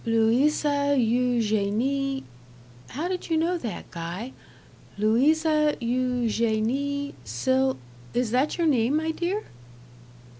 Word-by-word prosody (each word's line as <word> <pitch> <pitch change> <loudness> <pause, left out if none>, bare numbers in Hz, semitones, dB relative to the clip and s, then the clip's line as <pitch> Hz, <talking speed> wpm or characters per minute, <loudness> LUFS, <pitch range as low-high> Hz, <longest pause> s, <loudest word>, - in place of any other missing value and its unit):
"Louisa 285 +5 +2
Eugenie 245 +3 +1 0.7
how 305 +7 -3
did 365 -1 -4
you 325 - +2
know 335 +3 +1
that, 225 - -6
Guy? 175 +9 -6 0.6
Louisa 300 +8 +3
Eugenie 250 +3 0
Sil 265 0 0 0.3
is 240 -2 -1
that 260 +5 +1
your 340 - +1
name, 265 -1 +2
my 320 +1 0
dear?" 360 +6 -2
260 Hz, 100 wpm, -25 LUFS, 230-300 Hz, 0.7 s, Louisa